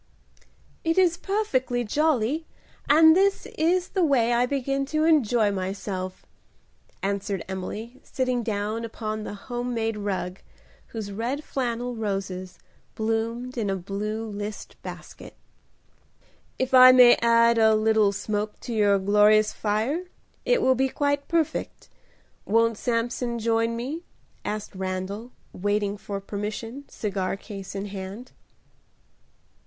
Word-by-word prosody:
"It 330 +1 0
is 360 -3 +4
perfectly 340 - -1
jolly, 300 +3 +1 0.4
and 320 +2 +7
this 390 +1 +2
is 350 +3 +1
the 375 - +1
way 245 -6 +3
I 245 +1 +3
begin 275 0 -1
to 310 +2 0
enjoy 240 -9 +3
myself," 190 -1 -4 0.8
answered 200 0 -2
Emily, 210 +6 -6
sitting 255 -2 -1
down 215 0 -2
upon 215 -1 -4
the - - -6
home 245 +3 -4
made 225 -1 -1
rug, 195 -2 -3 0.5
whose 215 -3 -6
red 240 +8 -3
flannel 245 -2 -2
roses 195 -4 -4 0.4
bloomed 230 +3 -2
in 210 -3 -1
a 195 - 0
blue 205 +4 -4
list 205 0 -6
basket. - - -10 1.2
"If 260 0 -2
I 255 0 +10
may 250 -1 +8
add 230 0 +5
a 220 -1 +5
little 215 -1 +3
smoke 210 +1 -3
to 240 - -5
your 205 -2 +4
glorious 210 +2 +4
fire, 225 - -1 0.4
it - - +3
will 260 - +5
be 265 +1 +1
quite 285 +1 -1
perfect. 330 -3 -2 0.5
Won't 230 +2 +2
Samson 235 0 -1
join 230 0 +1
me?" 270 +8 -4 0.4
asked 210 0 -4
Randal, 190 +5 -4 0.2
waiting 205 +1 0
for 200 -1 -5
permission, 215 +6 -5
cigar 195 -2 -2
case 195 -2 -9
in 195 +1 -3
hand. 200 +4 -7
225 Hz, 125 wpm, -25 LUFS, 205-255 Hz, 1.2 s, I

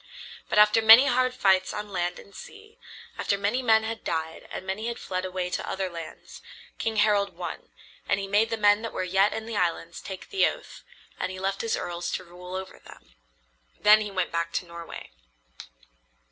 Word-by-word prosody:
But - - 0
after 210 +2 +6
many 225 +4 +9
hard 255 -1 +2
fights 190 -7 +2
on 210 0 -5
land 175 -1 -2
and 200 - -14
sea, 430 +1 -13 0.4
after 200 - 0
many 205 +6 0
men 220 -3 +4
had 225 0 -5
died 160 0 -4
and - - -6
many 210 +4 -3
had 235 - -3
fled 185 0 -4
away 185 -1 -3
to - - -3
other 190 -1 -3
lands, 165 -2 -10 0.4
King 225 -1 -1
Harald 200 -4 +2
won, 175 - -6 0.4
and 200 - +2
he 195 - -4
made 210 +3 +2
the 225 - -2
men 205 0 +4
that 230 - -5
were - - -2
yet 190 +3 +3
in 220 - -5
the 225 -2 -4
islands 170 -2 -2
take 190 -2 -9
the 390 - +4
oath, - - -7 0.4
and 185 - -2
he 185 - -7
left 195 +1 -2
his 230 - -1
earls 175 0 -4
to - - -3
rule 180 +1 -10
over 190 0 -7
them. - - -17 0.7
Then 215 +1 +6
he 210 - -3
went 185 -3 -2
back 170 0 -2
to - - -2
Norway. 170 - -9
195 Hz, 200 wpm, -26 LUFS, 180-220 Hz, 0.7 s, many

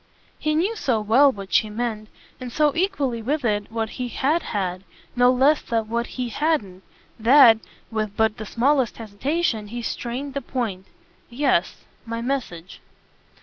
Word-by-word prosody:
He 305 0 0
knew 380 +8 +1
so 255 - 0
well 240 +7 +5
what 195 -4 -9
she 215 - +3
meant, 215 -1 -4 0.3
and 250 -1 -7
so 295 +1 +2
equally 290 -11 0
with 285 +4 -1
it 210 -1 -1
what 225 -1 -2
he 250 - -1
"HAD 295 +7 0
had" 185 -3 -3 0.3
no 245 0 +5
less 275 +4 +3
than 225 -2 -2
what 235 +1 -1
he 250 -1 -2
hadn't, 225 - -1 0.4
that, 235 -1 +7 0.3
with 215 -2 -3
but 220 -1 +2
the 215 - -7
smallest 260 +1 +1
hesitation, 225 +2 -2
he 235 +3 -6
strained 255 +5 -4
the 280 - -3
point. 215 -10 -4 0.4
"Yes 240 -8 0 0.2
my 230 0 -5
message." 235 -9 -4
235 Hz, 155 wpm, -23 LUFS, 215-275 Hz, 0.4 s, that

